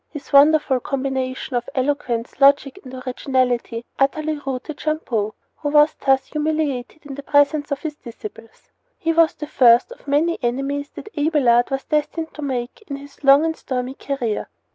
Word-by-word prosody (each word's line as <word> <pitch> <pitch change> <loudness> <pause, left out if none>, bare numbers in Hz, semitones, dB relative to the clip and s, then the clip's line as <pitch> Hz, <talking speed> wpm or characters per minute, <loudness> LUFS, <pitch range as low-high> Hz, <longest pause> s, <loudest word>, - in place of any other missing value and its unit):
His 295 -3 -10
wonderful 285 -2 +5
combination 265 0 -3
of 240 0 -2
eloquence, 255 -4 -1
logic, 280 +4 +4
and 255 - -10
originality 255 -2 -1
utterly 305 +2 0
routed 270 +3 -4
Champeaux, 235 -9 -2 0.2
who 290 - -3
was 295 +1 +5
thus 270 -1 +3
humiliated 305 -2 -2
in 285 - -7
the 280 - -7
presence 290 +1 +2
of 280 - -2
his 300 -2 -4
disciples. 225 -2 -11 0.3
He 330 0 0
was 330 -1 +4
the 300 - -6
first 245 - +4
of - - -14
many 310 +4 +1
enemies 275 +4 -2
that 425 - -10
Abelard 285 -6 +3
was 270 0 -2
destined 320 +2 -2
to 305 - -9
make 265 - -4
in 280 - -4
his 280 +1 -13
long 275 +3 +6
and 325 0 -1
stormy 255 -2 -4
career. 260 -6 -3
275 Hz, 165 wpm, -21 LUFS, 255-300 Hz, 0.3 s, long